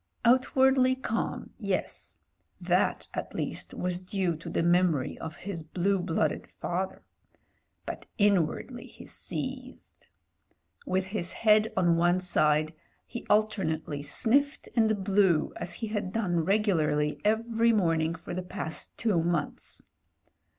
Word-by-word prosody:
Outwardly 260 +1 +4
calm 230 -3 -3
— - - -25
^yes: - - -2 0.4
that - - +1
at - - -5
least - - -3
was 180 0 -2
due 185 -2 -1
to 165 - -8
the - - 0
memory 175 -5 +2
of 160 -1 -6
his 175 +2 -5
blue 185 +5 0
blooded 165 -3 -1
father. 185 +2 -4 0.8
But - - -6
inwardly, 200 -7 +1
he - - -13
seethed. - - -6 0.8
With 190 +1 +1
his 190 -2 -3
head 215 0 +4
on 175 -2 +4
one 175 +2 +3
side 155 -3 +2 0.3
he 240 -2 -8
alternately 185 -9 +1
sniffed 250 - +1
and 220 -4 +2
blew 190 -5 +3
as - - -2
he 225 - -4
had 205 -3 -2
done 185 -7 0
regularly 160 -8 +1
every 230 +2 +2
morn 170 -7 +2
ing 160 +1 -1
for 175 - -8
the 185 - -2
past 180 -3 -5
two 205 -8 +2
months. 170 -3 -2
185 Hz, 130 wpm, -29 LUFS, 165-215 Hz, 0.8 s, Outwardly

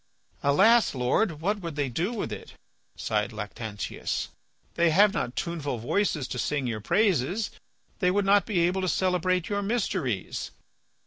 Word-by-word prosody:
"Alas! 200 +9 +4
Lord, 150 - +1
what 205 +5 0
would 165 -4 -5
they 145 -2 0
do 165 - -1
with 225 -4 -3
it," - - -9 0.4
sighed 105 0 -1
Lactantius. 105 0 -4 0.4
"They 170 0 +3
have 200 +5 +5
not 120 - -2
tuneful 150 -7 -2
voices 150 - 0
to 125 - -4
sing 145 0 -1
your 115 -3 -3
praises. 195 - +1 0.5
They 180 - +3
would 200 +2 +1
not 200 +1 +4
be 195 -6 +1
able 180 +3 +1
to 185 - 0
celebrate 185 -1 +1
your 205 -1 -1
mysteries." 195 - -2
170 Hz, 150 wpm, -27 LUFS, 125-200 Hz, 0.5 s, have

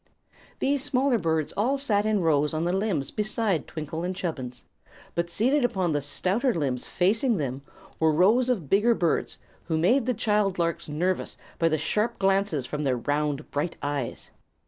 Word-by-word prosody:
These 275 -1 +1
smaller 270 -3 +2
birds 160 -3 -1
all 250 +7 +1
sat 215 -7 +1
in 215 -3 +1
rows 150 -2 +2
on 155 - -1
the 175 - 0
limbs 190 -8 -1
beside 215 -4 -1
Twinkle 160 +1 -5
and 185 +1 -2
Chubbins; 130 -9 -5 0.5
but 170 0 -1
seated 255 +10 +2
upon 190 -8 0
the 145 -1 0
stouter 190 - 0
limbs 135 -6 -2
facing 220 +6 +2
them 135 -3 -3 0.4
were 160 -1 +4
rows 215 +11 +4
of 200 - -1
bigger 215 - +3
birds 170 -5 0 0.3
who 160 -2 -1
made 230 +10 +3
the 250 - +1
child 210 -3 +1
larks 170 -2 -1
nervous 180 +5 -1 0.2
by 165 - +3
the 155 - +1
sharp 210 +10 -1
glances 195 -7 +1
from 150 - -4
their 130 -4 +1
round, 145 +3 -2
bright 150 +4 -2
eyes. 145 -4 -4
180 Hz, 170 wpm, -26 LUFS, 150-215 Hz, 0.5 s, were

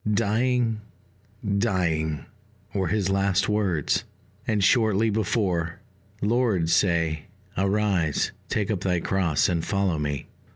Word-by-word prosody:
"Dying, 115 +1 +1 0.8
dying," 80 -8 0 0.5
were 95 -2 0
his 95 +1 0
last 95 0 +2
words; 100 -8 +1 0.4
and 105 -3 +1
shortly 110 0 +3
before, 95 -5 0 0.4
"Lord, 105 -7 +2
say 85 -4 +2 0.3
'Arise, 95 -5 +1 0.2
take 105 +1 0
up 100 - -1
thy 90 -2 +1
cross, 85 -4 +1
and 85 -2 0
follow 100 -5 0
me.'" 75 -1 -2
95 Hz, 110 wpm, -25 LUFS, 85-105 Hz, 0.8 s, shortly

